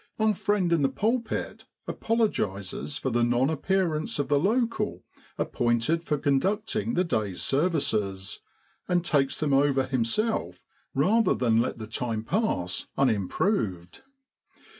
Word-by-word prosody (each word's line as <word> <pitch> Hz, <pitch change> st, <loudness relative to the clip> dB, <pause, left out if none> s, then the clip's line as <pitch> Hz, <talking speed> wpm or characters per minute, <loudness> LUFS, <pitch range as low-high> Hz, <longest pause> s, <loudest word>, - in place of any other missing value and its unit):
Our 220 Hz, -1 st, +3 dB
friend 195 Hz, -3 st, +1 dB
in 165 Hz, -, +2 dB
the 135 Hz, -, +3 dB
pulpit 220 Hz, -, -2 dB, 0.2 s
apologises 135 Hz, -, -1 dB
for 130 Hz, -, -2 dB
the 120 Hz, 0 st, +2 dB
non 120 Hz, +4 st, +2 dB
appearance 160 Hz, -1 st, 0 dB
of 145 Hz, -, -2 dB
the 145 Hz, -1 st, +4 dB
local 230 Hz, -, 0 dB, 0.3 s
ap -, -, -2 dB
pointed 120 Hz, +9 st, +1 dB
for 150 Hz, -, 0 dB
conducting 205 Hz, -, 0 dB
the 180 Hz, -, +3 dB
day's 110 Hz, -, -2 dB
services, 130 Hz, -, 0 dB, 0.5 s
and 175 Hz, -1 st, +1 dB
takes 140 Hz, -5 st, +1 dB
them 150 Hz, -3 st, +1 dB
over 135 Hz, -1 st, +3 dB
himself 130 Hz, -, -1 dB, 0.3 s
rather 225 Hz, +2 st, +3 dB
than 115 Hz, -2 st, +3 dB
let 120 Hz, -, -2 dB
the 110 Hz, -, -6 dB
time 110 Hz, 0 st, -3 dB
pass 115 Hz, -, -1 dB
unimproved. 105 Hz, -, 0 dB
145 Hz, 130 wpm, -27 LUFS, 115-195 Hz, 0.5 s, the